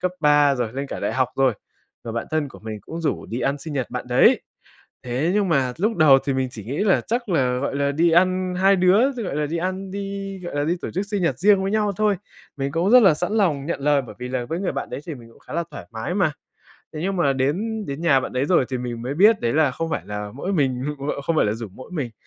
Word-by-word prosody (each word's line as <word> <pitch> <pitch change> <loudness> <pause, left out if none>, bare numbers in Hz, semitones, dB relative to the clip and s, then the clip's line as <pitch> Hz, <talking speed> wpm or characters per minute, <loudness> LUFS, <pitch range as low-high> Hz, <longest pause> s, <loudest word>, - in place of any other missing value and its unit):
cấp 185 0 0
3 145 -2 +5
rồi, 120 -3 -2
lên 135 +2 -4
cả - - -6
đại - - -1
học 130 -1 +1
rồi. 135 -2 +3 0.5
Người 115 - -5
bạn 115 - -3
thân 155 -2 0
của - - -13
mình 110 -1 -6
cũng 165 - -7
rủ 160 - -2
đi 120 +3 -4
ăn 140 +1 0
sinh 155 +2 -7
nhật 135 -4 -2
bạn - - -4
đấy. - - +5 0.6
Thế 125 +7 0
nhưng 205 -3 +2
mà 135 -6 +1
lúc 215 +4 0
đầu 145 -4 +7
thì 135 - +1
mình 130 -1 0
chỉ 110 -5 -9
nghĩ 135 +8 -4
là 205 -2 +3
chắc 235 0 -3
là, 130 -7 +1
gọi 140 +1 -2
là, 140 0 +1
đi 165 +3 +3
ăn 185 +1 +2
hai 195 +2 +4
đứa 195 +9 +4
gọi 220 - -4
là, 150 -1 0
đi 165 +3 -3
ăn, 185 +2 -3
đi 195 0 -5
gọi 175 - -5
là, 145 - +1
đi 170 +4 0
tổ - - -4
chức 195 +3 -3
sinh 205 -2 -2
nhật 135 -7 0
riêng 200 +1 +4
với 195 - -1
nhau 210 -2 +1
thôi. 210 -2 +2 0.4
Mình 140 0 -3
cũng 170 +5 +1
rất 250 0 +8
là 190 -7 +6
sẵn 175 +7 -3
lòng 165 -11 +1
nhận 160 -4 -3
lời 145 0 +2
bởi 120 - -11
vì 125 - -5
là 125 -1 -2
với 165 +9 -4
người 195 - -1
bạn 140 - -4
đấy - - -5
thì 160 - -4
mình 120 -4 -13
cũng - - -20
khá - - -12
là 170 +2 -1
thoải 90 - -9
mái 110 +10 -4
mà. 180 -6 +2 0.6
Thế 155 - -5
nhưng 195 +2 -1
mà 140 -6 +2
đến 195 +12 -1
đến 140 +3 -5
nhà 145 -6 +4
bạn - - -6
đấy 130 +2 0
rồi 160 -6 +3
thì 130 - -2
mình 120 -2 -5
mới 130 +3 -3
biết 210 +5 +5
đấy 115 0 0
là 150 -3 +3
không 165 +5 -4
phải - - -2
là 105 0 -5
mỗi 185 +8 -3
mình 130 -6 0 0.3
ờ, 140 - -2
không 165 +3 -1
phải - - +4
là 105 - 0
rủ 115 0 -6
mỗi 130 - -12
mình, 145 -9 -3
150 Hz, 285 wpm, -22 LUFS, 130-185 Hz, 0.6 s, rất